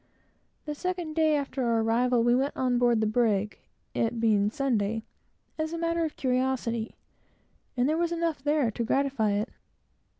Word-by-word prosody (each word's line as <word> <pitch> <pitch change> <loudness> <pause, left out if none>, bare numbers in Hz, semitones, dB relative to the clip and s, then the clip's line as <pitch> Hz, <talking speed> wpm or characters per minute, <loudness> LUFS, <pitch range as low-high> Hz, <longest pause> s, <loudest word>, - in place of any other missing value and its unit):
The 300 - -3
second 350 0 -3
day 315 -1 +3
after 275 -2 -2
our 230 -1 +2
arrival, 235 +1 +2
we 240 0 +4
went 270 +3 0
on 250 -2 +1
board 240 -2 +3
the - - +2
brig, 215 -2 +1 0.3
it 230 +1 -1
being 210 -3 +3
Sunday, 225 -4 -1 0.6
as 315 +1 -2
a - - -2
matter 335 0 0
of 315 - -3
curiosity; 250 -3 -1 0.8
and 245 +1 +3
there 315 +2 +1
was 340 0 0
enough 335 -4 -1
there 290 -5 +2
to 235 - -3
gratify 265 -4 +1
it. 210 +4 -1
250 Hz, 165 wpm, -28 LUFS, 225-300 Hz, 0.8 s, we